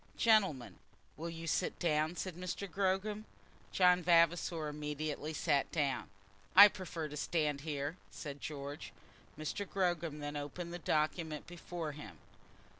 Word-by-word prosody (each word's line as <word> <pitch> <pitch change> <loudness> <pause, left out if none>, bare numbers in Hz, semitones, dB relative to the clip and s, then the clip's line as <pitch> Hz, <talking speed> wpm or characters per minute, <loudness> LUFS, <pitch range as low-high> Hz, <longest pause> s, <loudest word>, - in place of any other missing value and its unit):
"Gentlemen, 195 - +3 0.4
will 165 +2 -5
you 165 0 -7
sit 165 +3 0
down?" 155 0 +1
said 185 -1 -4
Mr. 180 +3 -4
Gogram. 195 +3 -1 0.5
John 180 -1 +5
Vavasor 170 -1 +3
immediately 150 0 -3
sat 145 -2 +1
down. 140 -8 -1 0.5
"I 200 +2 +12
prefer 175 -5 -5
to 150 - -8
stand 150 -2 0
here," 145 +1 -3
said 145 -2 -7
George. 145 -1 -6 0.4
Mr. 155 +6 -3
Gogram 175 -5 0
then 145 0 -5
opened 160 +4 -5
the 175 - -5
document 155 -1 -1
before 175 -2 -5
him. 105 - -10
160 Hz, 130 wpm, -35 LUFS, 150-180 Hz, 0.5 s, I